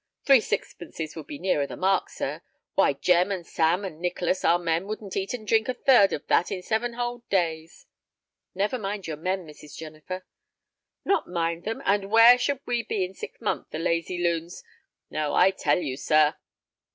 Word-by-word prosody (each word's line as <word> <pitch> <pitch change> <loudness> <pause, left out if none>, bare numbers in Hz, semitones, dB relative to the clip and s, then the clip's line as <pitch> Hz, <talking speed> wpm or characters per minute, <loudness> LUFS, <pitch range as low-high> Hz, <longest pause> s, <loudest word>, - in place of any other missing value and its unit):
"Three 275 -2 +7
sixpences 160 -6 -5
would 160 -3 -8
be 145 - -7
nearer 150 -4 0
the - - -8
mark, 190 +1 +1
sir. - - -4 0.3
Why, - - +3
Jem 180 +2 +2
and 185 -3 -3
Sam 170 +6 +1
and 160 -5 -7
Nicholas, 180 +1 -1
our 170 - +4
men, 170 +1 -1
wouldn't 210 -2 -6
eat 195 +5 -2
and 215 -3 -10
drink 225 +2 +2
a 255 - -1
third 245 -7 +5
of 145 - -4
that 175 - +2
in 185 -2 -4
seven 230 +4 -1
whole 240 0 -3
days." 165 -3 -1 0.7
"Never 205 +6 0
mind 200 -1 -4
your 155 -2 -4
men, 185 +3 -2
Mrs. 150 -1 -13
Jennifer." 160 +4 -8 0.8
"Not 395 - +1
mind 170 -1 -2
them! 225 +1 -4
And 200 0 +1
where 230 +3 +8
should 280 +2 -1
we 240 -1 0
be 205 -4 -1
in 185 - -10
six - - -9
months, 220 - -2
the - - -5
lazy 170 +1 -1
loons! 170 0 -2 0.5
No, 155 -1 -1
I 190 - +5
tell 150 -6 +1
you, 145 -7 -3
sir." 155 +1 +3
185 Hz, 190 wpm, -26 LUFS, 165-210 Hz, 0.8 s, where